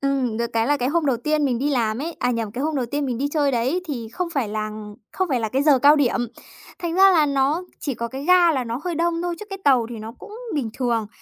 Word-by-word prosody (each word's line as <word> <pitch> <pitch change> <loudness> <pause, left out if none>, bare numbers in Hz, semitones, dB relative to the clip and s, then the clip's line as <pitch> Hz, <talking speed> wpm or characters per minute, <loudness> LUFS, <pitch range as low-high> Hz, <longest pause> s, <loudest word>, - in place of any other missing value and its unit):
ừm, 270 -5 0
được 235 0 0
cái 225 0 +1
là 290 0 +2
cái 250 -1 -1
hôm 325 0 +1
đầu 255 -3 +2
tiên 300 +4 0
mình 245 -4 0
đi 290 +3 0
làm 230 -4 0
ấy 330 +1 -5
à, 245 - +1
nhầm, 225 -3 -2
cái 260 +4 -3
hôm 310 -2 -1
đầu 250 -3 -1
tiên 285 +3 -2
mình 245 -2 -2
đi 285 +1 0
chơi 290 -3 +2
đấy 255 +10 0
thì 235 -6 -4
không 360 -1 -2
phải 250 -7 0
lằn 215 0 -5 0.2
không 375 -2 -1
phải 255 -4 0
là 220 - -1
cái 265 +5 0
giờ 285 -3 +5
cao 290 +4 +6
điểm, 265 -4 +2 0.6
thành 340 -1 -3
ra 385 +1 +7
là 310 -4 +4
nó 280 +5 +1 0.2
chỉ 275 -5 -2
có 235 +1 -4
cái 270 +3 -7
ga 355 -1 +5
là 260 -3 -1
nó 235 +3 -4
hơi 350 -2 -2
đông 335 +1 0
thôi, 350 -1 -2
chứ - - -6
cái 390 - -5
tàu 255 -5 +4
thì 230 - -6
nó 220 +1 -7
cũng 425 - -11 0.2
bình 245 -7 -1
thường. 235 -4 0
275 Hz, 290 wpm, -22 LUFS, 235-310 Hz, 0.6 s, ra